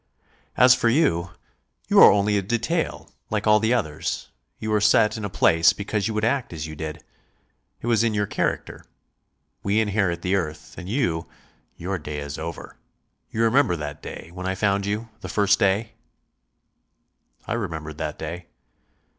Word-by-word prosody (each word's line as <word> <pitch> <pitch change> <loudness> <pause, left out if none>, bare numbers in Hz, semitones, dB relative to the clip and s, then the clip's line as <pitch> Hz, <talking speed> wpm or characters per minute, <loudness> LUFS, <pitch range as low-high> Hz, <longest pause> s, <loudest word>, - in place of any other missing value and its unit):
"As 125 0 +8
for 120 -2 +2
you 115 - +2 0.6
you - - +5
are - - +10
only 105 +1 +2
a 100 - +2
detail, 120 - -2 0.2
like 105 -1 -1
all 105 0 +5
the 110 +2 +1
others; 80 -11 -3 0.3
you 110 - -4
were 105 -1 +2
set 105 +1 +4
in 110 - -5
a 100 - -2
place 80 -2 +4
because 100 0 -2
you 110 - -3
would 105 +1 +1
act 130 +1 0
as 80 -1 -5
you 80 -1 -7
did. 80 0 -6 0.8
It - - -7
was 115 -1 +3
in 115 -2 +1
your 105 0 +1
character. - - -2 0.8
We 100 +2 +1
inherit 100 -5 0
the 95 0 0
earth 75 -5 -4
and 90 0 -8
you, 100 - 0 0.5
your 95 +2 -3
day 75 -2 -6
is 75 0 -5
over.... 80 0 -7 0.5
You 115 - -1
remember 115 -5 +3
that 75 -2 -6
day, 85 - -9
when 90 +1 -5
I 95 - -1
found 100 0 +1
you 110 +3 -3
the - - -8
first 105 0 +3
day?" 105 +2 +1 1.5
I - - -2
remembered 80 -9 -4
that 75 -1 -3
day. 85 +2 -6
100 Hz, 170 wpm, -24 LUFS, 85-110 Hz, 1.5 s, are